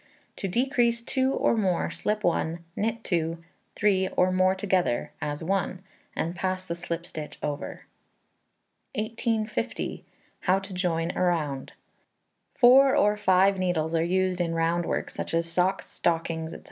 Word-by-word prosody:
To 195 - -2
decrease 235 +2 +1
2 260 +2 +1
or 235 - +2
more, 190 -6 0
slip 210 0 -2
1, 170 -1 0
knit 225 +2 -1
2, 165 -2 0 0.4
3, 190 -2 +2
or 185 0 +4
more 185 +1 +3
together, 190 -10 0
as 145 +2 -3
one, 190 +1 -1 0.3
and 170 +2 -2
pass 185 0 -2
the 170 - -3
slip 170 0 -4
stitch 155 -3 -7
over. 145 0 -4 1.1
1850. 220 +1 -2 0.4
How 185 +1 +2
to 195 0 -6
Join 175 -2 0
a - - -1
Round. 155 -7 0 0.8
Four 265 +2 +7
or 210 0 +4
five 195 -1 +3
needles 165 -3 0
are 165 - +2
used 185 +1 +1
in 165 -1 -1
round 165 +1 +1
work, - - -2
such - - -4
as 165 0 +1
socks, 180 +3 +1
stockings, 165 -1 -1
&c. - - -6
185 Hz, 145 wpm, -27 LUFS, 165-210 Hz, 1.1 s, Four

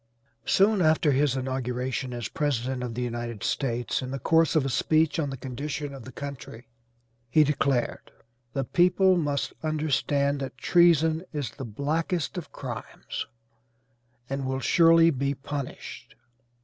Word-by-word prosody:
Soon 200 0 +4
after 155 -2 +3
his 140 0 +2
inauguration 130 0 -2
as 120 -3 -4
President 130 -4 -1
of 120 -2 -4
the 125 - -2
United 120 -3 -4
States, 120 -3 -1
in 130 - -5
the 135 - -3
course 165 +4 +3
of 150 -4 +3
a - - 0
speech 155 +5 +2
on 145 -3 0
the 135 - -5
condition 140 +3 -5
of 135 -4 -10
the 130 - -9
country 130 -3 -8 0.6
he 155 +5 +5
declared, 140 -4 0 0.4
"the 135 - 0
people 180 +6 +4
must 145 -5 -1
understand 145 -2 0
that 135 -1 -6
treason 165 0 +4
is 145 -6 -3
the 135 +3 -7
blackest 155 - -2
of 175 -4 -6
crimes, 120 -4 -6 1.0
and 135 0 -3
will 130 0 -1
surely 165 +3 +5
be 140 0 -1
punished." 140 0 -7
140 Hz, 145 wpm, -27 LUFS, 130-155 Hz, 1.0 s, he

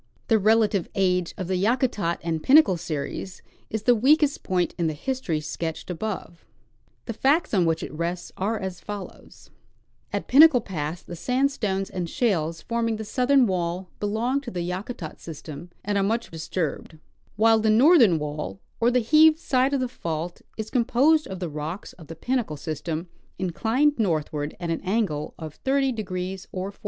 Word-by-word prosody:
The 225 -2 +5
relative 215 -3 +3
age 180 -2 +1
of 185 -3 -4
the 185 0 0
Yakutat 210 -4 +1
and 165 -2 -2
Pinnacle 265 - +6
series 165 +2 -5 0.3
is 220 -1 -3
the 245 - +5
weakest 285 +5 +3
point 180 -2 0
in 170 - +2
the 155 - -2
history 250 - -2
sketched 160 +3 -5
above. 180 -2 -5 0.6
The 230 - -4
facts 280 +8 +2
on 185 -4 +3
which 165 -1 0
it - - -7
rests 170 +3 -3
are 215 +4 -1
as 190 -3 -5
follows: 205 -2 -9 0.6
At - - -3
Pinnacle 290 -1 +7
pass 165 -3 -4
the 175 - -8
sandstones 220 -3 0
and 180 -3 -3
shales 170 - 0
forming 230 -1 -1
the 220 0 -6
southern 255 +3 +3
wall 180 -1 -2
belong 230 +6 0
to 270 - -7
the 175 -4 -3
Yakutat 185 -2 -5
system 160 +1 -9 0.2
and 205 0 +1
are - - +2
much 225 +4 -1
disturbed, 160 -1 -4 0.4
while 225 +1 +5
the 220 0 +2
northern 235 - +6
wall, 150 -10 -5 0.2
or 235 - +4
the 250 0 +2
heaved 310 +6 +6
side 265 -4 +1
of 280 - +1
the 255 - 0
fault, 170 -7 -5 0.2
is 220 -1 -5
composed 265 +5 +3
of 190 -1 -6
the 180 - -3
rocks 155 +5 -6
of 160 -4 -14
the 165 - -8
Pinnacle 235 - -2
sys 155 0 -5
tem, 165 +1 -3 0.3
inclined 230 - +1
northward 155 -6 -1
at 170 -2 -3
an 165 - -2
angle 190 -7 -1
of 155 -2 -9
30° 205 -9 -1
or 190 +1 -4
40°. 200 - -27
195 Hz, 170 wpm, -25 LUFS, 170-240 Hz, 0.6 s, Pinnacle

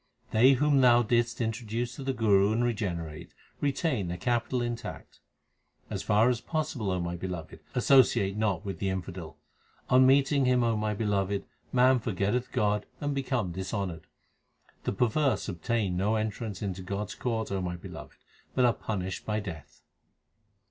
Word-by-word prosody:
They 125 +5 +6
whom 140 +1 +3
Thou 120 -1 +6
didst 120 +1 +1
introduce 115 +1 -2
to 135 - -7
the 135 - 0
Guru 105 -5 +3
and 115 +2 +1
re 120 -1 +2
generate, 85 -8 -5 0.2
retain 140 - 0
their 90 +1 -3
capital 120 +5 0
intact. 120 -1 -6 0.7
As - - -2
far 105 +3 +3
as 120 -1 -2
possible, 150 - -2
O 90 -1 0
my 85 0 -3
Beloved, 85 -3 -6 0.2
associate 125 -7 +4
not 105 -3 0
with 95 -5 -5
the 100 - 0
infidel. 90 -4 -5 0.5
On 130 +1 +7
meeting 140 +1 +4
him, 125 -1 +3
O 115 -1 +2
my 105 0 -1
Beloved, 100 -2 0 0.3
man 130 0 +5
forgetteth 110 +3 -1
God 105 0 0
and 145 -1 -1
becometh 125 -9 -1
dishonoured. 95 -3 -4 0.8
The - - +1
perverse 125 +6 +1
obtain 95 +1 -1
no 105 +4 +1
entrance 110 -1 -3
into 95 -2 -3
God 100 +2 -4
s - - -5
court, 115 -4 -2
O 95 -1 -1
my 90 -1 -3
Beloved, 85 - -10 0.4
but 125 - +4
are 120 - +4
punished 95 -5 -4
by 105 0 0
Death. 80 -8 -9
110 Hz, 160 wpm, -29 LUFS, 95-125 Hz, 0.8 s, On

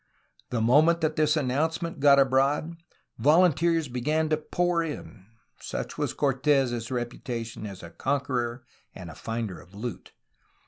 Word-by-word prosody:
The 120 -2 -1
moment 155 +9 +4
that 155 -1 0
this 155 0 +2
announce 150 +4 0
ment 170 -3 -5
got 140 0 +6
abroad, 140 +4 +2 0.4
volunteers 165 +3 +3
began 150 +6 0
to 155 - +2
pour 175 +2 0
in, 100 - -7 0.2
— - - -42
such - - -5
was - - -2
Cortes' 135 -4 +1
reputation 120 -3 -4
as 95 -3 -9
a 85 - -9
conqueror 130 -3 -2 0.3
and 85 -4 -9
finder 115 -5 -4
of 90 +2 -18
loot. 115 +3 -7
135 Hz, 140 wpm, -27 LUFS, 120-155 Hz, 0.4 s, got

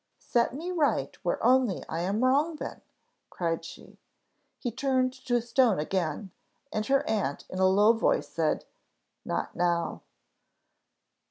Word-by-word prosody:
"Set 240 +1 0
me 340 +5 -4
right 320 -5 +1
where - - 0
only 250 -6 +3
I 160 - -3
am 195 +7 0
wrong 290 +6 +3
then," - - -7 0.5
cried 165 -2 -2
she. 165 - -12 0.6
He 240 - -3
turned 255 +1 +1
to 255 -2 -1
stone 235 -2 +3
again, 175 +3 -2 0.4
and 215 - 0
her 275 0 +2
aunt 200 -10 -1
in 185 - -4
a 190 - +5
low 205 +4 +5
voice, 225 - +1
said, 160 -2 -1 0.6
"Not - - -3
now." 170 -2 0
225 Hz, 140 wpm, -28 LUFS, 180-260 Hz, 0.6 s, a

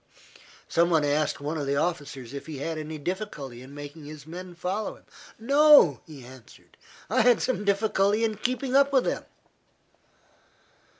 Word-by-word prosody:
Some 170 +1 +2
one 160 -3 +3
asked 145 +1 0
one 150 +3 -3
of 145 - -3
the 140 - 0
officers 140 -6 -3
if 140 - -7
he 155 -3 -6
had 160 +3 -4
any 155 0 -6
difficulty 150 - -5
in 135 +2 -12
making 145 +1 -9
his 150 -1 -10
men 175 +2 -9
follow 190 +5 -3
him. - - -21 0.3
"No," 280 - +6
he 145 -6 -11
answered, 130 -1 -16 0.3
"I - - +2
had 240 +1 +5
some 255 -5 -1
difficulty 200 +1 +1
in 220 -2 0
keeping 255 +3 -2
up 280 0 +5
with 265 -2 +3
them." - - -2
165 Hz, 165 wpm, -26 LUFS, 145-215 Hz, 0.3 s, No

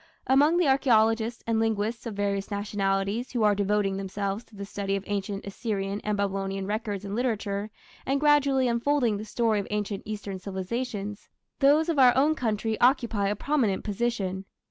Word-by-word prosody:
Among 290 +6 +4
the 350 -4 +3
archaeologists 230 -3 +2
and 230 -1 +1
linguists 225 +1 -1
of 220 - -5
various 200 -1 -1
nationalities 200 +2 -1
who 235 -3 +1
are 210 -1 +5
devoting 200 -1 0
themselves 195 +2 -3
to 225 - -19
the 200 0 -6
study 195 0 -2
of 195 - -3
ancient 200 -1 -3
Assyrian 200 -1 -3
and 210 -1 -1
Babylonian 195 -1 -2
records 205 -1 -3
and 200 - -5
literature, 215 -4 -1 0.3
and 275 +1 0
gradually 280 -3 +3
unfolding 235 -1 +1
the 210 - -6
story 220 -1 +1
of 200 - -4
ancient 210 -1 -2
Eastern 205 -3 -5
civilization, 205 +2 -4 0.4
those 295 +3 +4
of 325 -4 0
our 255 -1 +6
own 295 +4 +4
country 220 -5 -2
occupy 235 -5 +3
a 205 - 0
prominent 230 -5 0
position. 200 -3 -2
210 Hz, 165 wpm, -27 LUFS, 200-240 Hz, 0.4 s, our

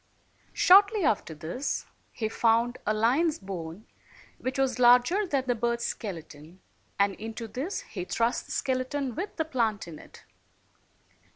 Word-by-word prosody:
Shortly 400 +2 +6
after 200 - 0
this 170 - -3 0.3
he 220 - -2
found 230 +2 +1
a - - +3
lion's 270 +9 +2
bone 185 0 -7 0.5
which 255 +2 -3
was 265 -1 0
larger 250 +12 +5
than 275 -5 0
the 250 - +2
bird's 235 0 -1
skeleton, 165 -3 -7 0.4
and 200 0 +3
into 225 +1 -6
this 270 - -4
he 180 -3 -7
thrust 230 +5 0
the - - -10
skeleton, 260 0 -1
with 365 - -5
the 320 - -1
plant 230 - -1
in 160 -3 -9
it. - - -15
235 Hz, 145 wpm, -28 LUFS, 205-270 Hz, 0.5 s, Shortly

